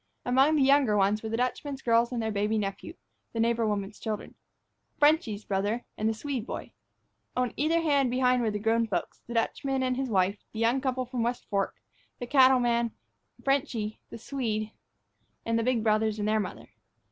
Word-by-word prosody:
Among 265 +5 +4
the 290 - +4
younger 270 -6 +4
ones 200 +2 +2
were 220 - -5
the 225 - -1
Dutchman's 270 +2 -2
girls 235 +1 +3
and 245 - -2
their 220 - -1
baby 210 +2 0
nephew, 205 - -4 0.4
the 230 - -3
neighbor 230 0 +2
woman's 205 0 -3
children. 215 -1 -4 0.6
"Frenchy's" 290 - +2
brother, 205 +4 -1
and 215 +1 0
the - - 0
Swede 255 0 -4
boy. - - -6 0.7
On 250 -1 0
either 325 +3 +2
hand 285 -4 +3
and - - -1
behind 250 0 +2
were 225 - +1
the 210 - -2
grown 225 +2 +2
people, 180 -5 0 0.2
the 235 - -6
Dutchman 265 +3 0
and 255 0 0
his 265 -1 -2
wife, 195 0 +1
the 220 - -5
young 235 +4 +2
couple 260 -1 -1
from 250 0 -5
the 230 - +1
West 240 +1 -2
Fork, 200 -1 0 0.4
the 245 - -5
cattleman, 245 -3 +4 0.5
"Frenchy," 240 -6 -1
the - - -8
Swede, 220 -3 -3 0.7
and 230 0 +1
the - - 0
big 245 -2 +1
brothers 215 0 +2
and 210 0 -1
their 215 0 +2
mother. 205 - -6
230 Hz, 195 wpm, -28 LUFS, 215-260 Hz, 0.7 s, Among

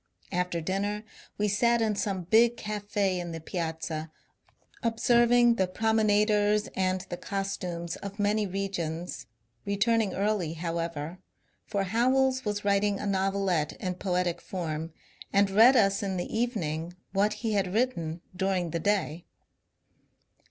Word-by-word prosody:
After 180 -2 -1
dinner 200 +4 -2 0.3
we 210 - +1
sat 235 +4 +3
in 220 -2 +1
some 195 -3 -2
big 230 +6 +4
caf 210 -1 -5
^ 205 - -19
in 180 -4 0
the 165 - -5
Piazza 160 -1 -4 0.7
observing 235 0 +4
the 190 - +2
promenaders 210 0 +2
and 185 0 +1
the 175 - -4
costumes 180 -4 -4
of 200 0 -8
many 210 0 +1
regions; 180 -3 -4 0.4
returning 210 0 +1
early, 200 -5 0
however, 165 0 -4 0.5
for 200 -2 0
Howells 260 +5 +2
was 205 -1 -3
writing 200 0 +2
a - - -4
novelette 195 -5 0
in 185 -1 -3
poetic 180 -2 -1
form 165 -3 -4 0.4
and 200 0 +3
read 230 +6 +7
us 195 -4 +3
in 195 -2 -2
the 175 - -4
evening 175 -8 -2 0.2
what 205 +2 +2
he 220 - +1
had 195 -3 +1
written 180 -8 -1
during 185 -3 0
the 170 - -1
day. 175 -3 -1
195 Hz, 135 wpm, -28 LUFS, 175-210 Hz, 0.7 s, read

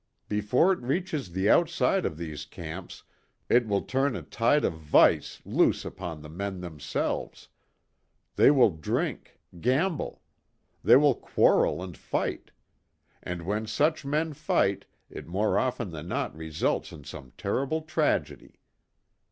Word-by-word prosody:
Before 105 - +2
it - - -5
reaches 145 - -2
the 95 +3 0
outside 170 - +3
of 80 - -6
these 80 -3 -6
camps 85 +2 -8 0.5
it 120 -1 +4
will 100 -1 0
turn 135 0 0
a - - -5
tide 115 +7 +2
of - - 0
vice 80 -2 +3
loose - - +2
upon 80 -3 -6
the - - -9
men 95 +4 -5
themselves. 80 -5 -4 0.9
They - - +6
will 130 -7 +5
drink, 80 -3 -3 0.2
gamble. 145 - 0 0.6
They - - +7
will 145 +1 +6
quarrel 90 - +2
and 90 -3 -8
fight. - - -3 0.7
And 90 -1 -5
when 105 +5 -2
such 155 +8 +1
men 155 +3 -1
fight 120 -9 0 0.2
it - - -9
more 100 +5 +1
often 125 -6 -2
than 80 0 -7
not - - -2
results 80 -1 -2
in 75 - -11
some 65 -2 -10
terrible 140 +10 -1
tragedy. 160 - -1
105 Hz, 135 wpm, -27 LUFS, -, 0.9 s, They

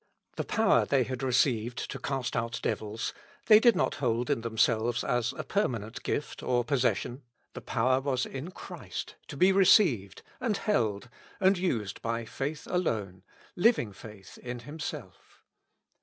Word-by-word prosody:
The - - -2
power 225 0 +3
they 135 -2 +2
had 130 +1 -5
received 125 -2 +1
to - - -5
cast 135 -3 -3
out 115 0 -2
devils, 110 +1 -2 0.3
they 215 -1 +8
did 235 0 +5
not - - +1
hold 120 -1 0
in - - 0
themselves 115 +1 +1
as 120 -1 0
a - - -5
permanent 115 - -2
gift 145 - -3
or 120 -1 +1
possession; 125 0 0 0.3
the - - -7
power 130 +2 +1
was 130 -2 0
in 135 +6 -6
Christ, 185 - -7
to - - -8
be 185 +2 +5
received, 180 - +4 0.2
and 230 -5 0
held, 110 - 0 0.3
and 190 0 +4
used 115 - -2
by 115 0 -2
faith 145 +6 -4
alone, 105 - -2 0.3
living 175 - +3
faith 100 0 -12
in 120 -1 -6
Himself. 150 +5 -8
125 Hz, 150 wpm, -29 LUFS, 115-160 Hz, 0.3 s, they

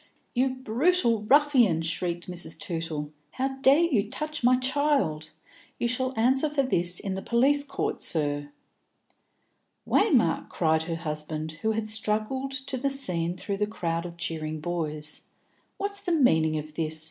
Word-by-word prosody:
"You 260 +1 +1
brutal 255 - +3
ruffian!" 245 - +4
shrieked 170 +1 -2
Mrs. 175 -2 -3
Tootle. 160 -4 -3 0.2
"How 265 +1 -3
dare 280 +5 +5
you 225 -11 +1
touch 305 +2 -4
my 250 +1 +5
child? 260 - 0 0.5
You 240 - 0
shall 255 +2 -1
answer 265 +6 +3
for 290 -2 0
this 175 -8 +1
in 195 - -4
the 190 - -4
police 270 +7 +3
court, 280 - -3
sir." 145 -2 +2 1.4
"Waymark," - - +2
cried 160 0 +1
her 165 0 -3
husband, 155 -1 -4
who 220 0 +1
had 215 0 -3
struggled 215 +5 0
to 265 0 -1
the 275 +2 0
scene 180 -11 -2
through 200 +1 -4
the 210 +1 0
crowd 170 -5 -3
of 170 0 -11
cheering 155 -2 -3
boys, 155 -2 -4 0.5
"what's 405 0 -2
the 365 -3 -2
meaning 160 - +3
of 155 0 -7
this? 155 0 -2
210 Hz, 150 wpm, -26 LUFS, 165-265 Hz, 1.4 s, dare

